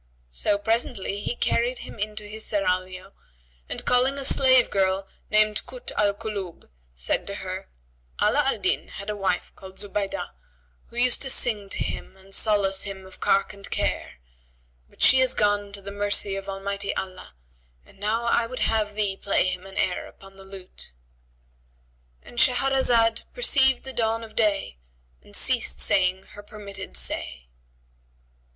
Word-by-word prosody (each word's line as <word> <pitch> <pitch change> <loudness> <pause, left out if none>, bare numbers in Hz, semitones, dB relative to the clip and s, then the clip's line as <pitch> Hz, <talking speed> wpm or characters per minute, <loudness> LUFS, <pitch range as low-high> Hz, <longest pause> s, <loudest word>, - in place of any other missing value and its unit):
So 200 - +1
presently 215 -2 -1
he 225 - -2
carried 240 +1 +1
him - - -10
into 210 +1 -3
his 215 +1 -5
serraglio 185 -1 -2 0.6
and - - -3
calling 255 +3 +3
a 275 - -2
slave 260 -2 +5
girl 195 0 +1 0.2
named 215 0 +3
Kъt - - -4
al 205 -1 +1
Kulъb, 200 -5 -6 0.3
said - - 0
to - - -4
her, - - -6 0.5
"Ala - - +3
al - - +2
Din - - 0
had 200 +1 -6
a - - -4
wife 190 -3 -1
called 190 0 -12
Zubaydah, 205 -1 -2 0.6
who - - -15
used 245 +1 +3
to 270 - +1
sing 210 -6 +1
to - - 0
him 190 - -6
and 190 +1 -15
solace 200 -3 +3
him 195 -1 -6
of 190 - -15
cark 195 - +2
and 200 0 -10
care; - - -1 0.8
but - - -4
she 260 0 +7
is 260 -1 +4
gone 205 -1 +1
to 200 -1 -7
the 200 - -6
mercy 205 -1 0
of 195 0 -6
Almighty 200 +1 -3
Allah, 185 - -6 0.5
and - - -21
now 215 +3 0
I 235 0 +2
would 255 +2 -6
have 215 -2 +1
thee 205 -2 +1
play 195 -1 +1
him 185 +1 -5
an 195 - -11
air 180 - 0
upon 195 0 -16
the 195 - -13
lute,"—And - - -14
Shahrazad 245 -3 +3
perceived 265 - +4
the 265 - -7
dawn 225 -1 0
of 220 - -11
day 200 - 0 0.4
and - - -12
ceased 60 +1 +2
saying 185 - +3
her 205 - -10
permitted 205 - -8
say. 60 0 -3
200 Hz, 160 wpm, -25 LUFS, 190-225 Hz, 0.8 s, she